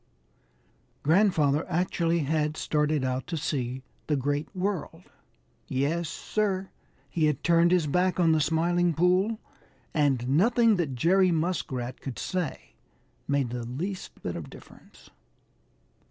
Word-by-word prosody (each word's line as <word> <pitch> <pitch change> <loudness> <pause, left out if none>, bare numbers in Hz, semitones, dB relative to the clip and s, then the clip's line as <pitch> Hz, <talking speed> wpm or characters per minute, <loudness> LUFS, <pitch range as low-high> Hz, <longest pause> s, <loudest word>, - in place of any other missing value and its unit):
Grandfather 155 -4 +3
actually 170 -1 +1
had 150 +1 0
started 150 -2 0
out 130 0 -2
to 165 -1 -3
see 130 -4 -3 0.2
the 150 - +2
Great 145 +2 -1
World. 180 -3 -3 0.6
Yes, 150 +5 -1
Sir, 195 +2 -2 0.4
he 155 +3 0
had 150 -3 -1
turned 170 0 +4
his 180 -3 +3
back 180 +5 +1
on 165 -2 +4
the 160 -1 +3
Smiling 170 +2 +1
Pool, 185 +6 +2 0.6
and 135 -5 +1
nothing 220 - +4
that 150 -7 -1
Jerry 185 +8 +4
Muskrat 155 -7 -2
could 130 -6 -6
say 180 - -4 0.5
made 140 -4 0
the 120 -1 -4
least 170 +11 -5
bit - - -3
of - - -7
difference. - - -16
160 Hz, 125 wpm, -27 LUFS, 140-180 Hz, 0.6 s, turned